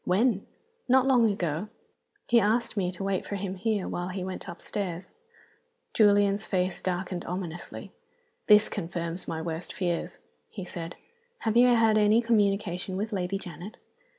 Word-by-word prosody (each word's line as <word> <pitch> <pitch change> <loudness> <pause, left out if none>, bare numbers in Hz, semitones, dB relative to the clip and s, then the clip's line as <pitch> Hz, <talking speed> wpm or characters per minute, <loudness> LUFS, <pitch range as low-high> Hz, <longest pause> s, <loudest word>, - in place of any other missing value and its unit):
"When?" 200 +2 +2 0.4
"Not 260 +1 +5
long 245 -4 +5
ago. 175 -1 -2 0.6
He 235 - +5
asked 225 +3 +1
me 190 -4 0
to 185 +1 -6
wait 195 -1 0
for 200 - -5
him 195 -1 -3
here 205 0 -1
while 175 0 -3
he 185 0 -4
went 185 +1 -6
upstairs." 180 0 -5 0.8
Julian's 205 -1 +4
face 185 -2 -1
darkened 180 -1 -2
ominously. 175 -1 -6 0.6
"This 210 0 +7
confirms 170 +1 -4
my 160 0 -3
worst 165 +1 -3
fears," 175 -3 -2 0.3
he 195 -4 -7
said. 170 -1 -6 0.5
"Have 220 -1 0
you 245 +1 +7
had 225 -3 +4
any 210 +2 +5
communication 200 -5 +1
with 215 +2 -3
Lady 190 0 -1
Janet?" 180 +2 -9
195 Hz, 150 wpm, -28 LUFS, 180-215 Hz, 0.8 s, This